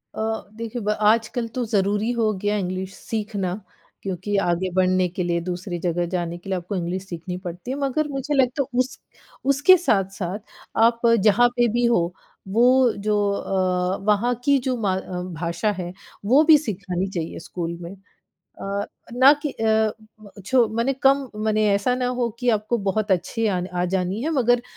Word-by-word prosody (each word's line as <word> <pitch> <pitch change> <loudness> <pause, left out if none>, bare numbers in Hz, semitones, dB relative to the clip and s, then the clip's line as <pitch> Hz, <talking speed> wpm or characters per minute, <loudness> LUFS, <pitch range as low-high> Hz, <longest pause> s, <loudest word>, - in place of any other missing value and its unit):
अ, - - -3 0.3
देखिए 230 +1 -5
ब 210 - -2 0.2
आजकल 230 +1 -1
तो 250 - +1
ज़रूरी 205 +1 +1
हो 215 -1 +3
गया 205 0 0
इंग्लिश 185 +1 -4
सीखना, 205 -4 -3 0.5
क्योंकि 195 +2 -3
आगे 175 +2 0
बढ़ने 185 0 +3
के 180 +1 -3
लिए, 170 -1 0
दूसरी 180 0 -4
जगह 175 0 0
जाने 175 -1 -2
के 175 +3 -11
लिए, 190 - 0
आपको 180 +3 -5
इंग्लिश 180 +1 -3
सीखनी 175 0 -6
पड़ती 175 +8 -6
है, 270 - -3
मगर 280 +2 0
मुझे 275 +1 -3
लगता 265 0 +2
है 250 -1 -4
उस 255 +1 -1 0.5
उसके 290 +7 +6
साथ-साथ 195 -1 0 0.5
आप 235 0 0 0.2
जहाँ 215 +4 +5
पे 240 -1 +3
भी 240 - +2
हो, 180 -7 +2 0.3
वो 225 +5 +3 0.4
जो 210 -1 +3
अ, 185 -2 0
वहाँ 240 +4 +1
की 280 -1 +5
जो 255 - +1
म 185 -1 -3
भाषा 170 +5 -1
है, 175 0 -5 0.3
वो 265 +8 +5
भी 315 -1 +7
सिखानी 190 -2 -2
चाहिए 170 -4 -4
स्कूल 170 -1 -4
में। 170 +3 -8 0.7
अ, 200 +1 -2 0.3
ना 260 +3 +7
कि 295 - -1
अ, 220 -1 +1 0.3
म 210 - -13 0.2
छो 255 -3 +4
माने 235 +4 +1
कम 275 0 +4 0.2
माने 215 0 +2
ऐसा 200 +5 +1
ना 250 0 -1
हो 245 -1 +1
कि 245 - -2
आपको 215 +2 0
बहुत 210 +2 0
अच्छी 190 +5 -1
आन 180 - -2
आ 180 0 0
जानी 190 +4 -1
है, 315 - -1
मगर 245 -5 +2
205 Hz, 175 wpm, -23 LUFS, 180-240 Hz, 0.7 s, भी